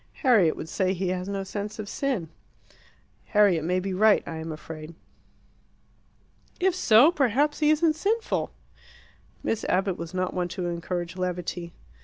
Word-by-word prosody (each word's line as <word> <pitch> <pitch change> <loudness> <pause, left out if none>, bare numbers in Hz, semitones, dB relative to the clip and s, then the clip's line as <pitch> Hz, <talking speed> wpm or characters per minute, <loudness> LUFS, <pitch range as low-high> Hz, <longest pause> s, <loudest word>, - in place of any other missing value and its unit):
"Harriet 215 - +4
would - - -6
say 185 +2 0
he 185 0 -2
has 180 0 -3
no 195 -1 -2
sense 205 +2 -5
of 215 -2 -6
sin." 235 - -2 1.0
"Harriet 200 -7 +3
may 180 +3 +1
be 190 +1 -3
right, 210 +2 +4
I 165 - -5
am 160 0 -5
afraid." 155 +1 -9 1.6
"If 380 0 +2
so, 280 -4 +6
perhaps 290 -1 +1
he 300 -1 +3
isn't 310 +1 +3
sinful!" 435 +7 -1 0.9
Miss 225 - -1
Abbott 190 0 0
was 170 +2 -6
not 185 0 -1
one 180 -1 -1
to 180 0 -5
encourage 175 0 -4
levity. 180 -1 -3
190 Hz, 150 wpm, -26 LUFS, 175-235 Hz, 1.6 s, so